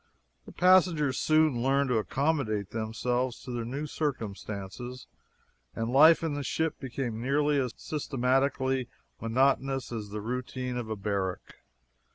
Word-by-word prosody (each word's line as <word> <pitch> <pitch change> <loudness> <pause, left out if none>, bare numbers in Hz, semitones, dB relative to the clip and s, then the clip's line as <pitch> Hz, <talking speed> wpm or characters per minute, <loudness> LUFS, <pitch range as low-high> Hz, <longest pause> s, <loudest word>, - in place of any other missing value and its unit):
The - - -9
passengers 175 -7 +4
soon 155 -5 +3
learned 135 +2 +2
to 120 -3 +2
accommodate 115 -6 -1
themselves 120 +3 -1
to 125 - -7
their 120 -1 -3
new 135 +6 -4
circumstances, 120 -4 -5 0.7
and 115 +1 -2
life 160 +5 +7
in 160 -3 -1
the 145 - -3
ship 160 +3 -1
became 125 -4 -4
nearly 145 +3 +2
as 125 -3 -2
systematically 130 -2 0 0.3
monotonous 135 +3 +1
as 110 -3 -5
the 105 +1 -5
routine 125 +2 -4
of 120 -3 -4
a 110 - -2
barrack. 100 -2 -3
130 Hz, 135 wpm, -29 LUFS, 115-140 Hz, 0.7 s, life